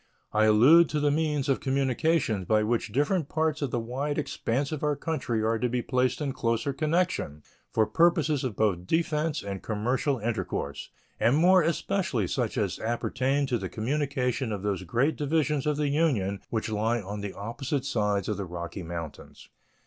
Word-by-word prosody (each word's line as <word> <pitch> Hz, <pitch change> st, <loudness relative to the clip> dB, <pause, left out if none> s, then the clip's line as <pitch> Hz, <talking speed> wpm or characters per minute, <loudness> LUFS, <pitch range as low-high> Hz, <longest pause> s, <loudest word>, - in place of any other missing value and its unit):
I 110 Hz, 0 st, +4 dB
allude 135 Hz, +11 st, +6 dB
to 150 Hz, -, -1 dB
the 145 Hz, 0 st, +2 dB
means 150 Hz, -2 st, 0 dB
of 135 Hz, -, +2 dB
communication 135 Hz, -, +1 dB
by 110 Hz, +4 st, +2 dB
which 110 Hz, -1 st, -1 dB
different 145 Hz, -, 0 dB
parts 155 Hz, -1 st, 0 dB
of 140 Hz, -, -1 dB
the 120 Hz, -, -1 dB
wide 135 Hz, +6 st, -3 dB
expanse 140 Hz, -2 st, -1 dB
of 155 Hz, -, -4 dB
our 150 Hz, -1 st, +2 dB
country 130 Hz, -9 st, -2 dB
are 110 Hz, 0 st, +1 dB
to 125 Hz, -, 0 dB
be 125 Hz, 0 st, -1 dB
placed 130 Hz, +1 st, 0 dB
in 140 Hz, -3 st, -1 dB
closer 115 Hz, +4 st, -1 dB
connection 155 Hz, -, -1 dB, 0.3 s
for 110 Hz, -, +3 dB
purposes 160 Hz, -, +2 dB
both 110 Hz, -6 st, 0 dB
of 90 Hz, +1 st, -14 dB
defense 160 Hz, -1 st, 0 dB
and 100 Hz, -1 st, -5 dB
commercial 125 Hz, +6 st, 0 dB
intercourse, 110 Hz, -10 st, -3 dB, 0.3 s
and 125 Hz, +5 st, +3 dB
more 185 Hz, +3 st, +6 dB
especially 170 Hz, -, 0 dB
such -, -, -2 dB
as -, -, -1 dB
appertain 130 Hz, +4 st, 0 dB
to 125 Hz, -3 st, -1 dB
the 95 Hz, -2 st, -4 dB
communication 130 Hz, 0 st, -1 dB
of 100 Hz, -2 st, -4 dB
those 100 Hz, -3 st, -1 dB
great 130 Hz, -, +1 dB
divisions 150 Hz, -1 st, 0 dB
of 150 Hz, -1 st, +1 dB
the 150 Hz, -1 st, 0 dB
Union 125 Hz, -, +1 dB
which 110 Hz, -2 st, -2 dB
lie 110 Hz, +2 st, 0 dB
on 100 Hz, 0 st, -6 dB
the 100 Hz, -1 st, -5 dB
opposite 130 Hz, +6 st, -3 dB
sides 105 Hz, -7 st, 0 dB
of 105 Hz, -, -1 dB
the 100 Hz, -, -3 dB
Rocky 85 Hz, +2 st, -6 dB
Mountains. 85 Hz, -2 st, -8 dB
130 Hz, 180 wpm, -27 LUFS, 110-150 Hz, 0.3 s, allude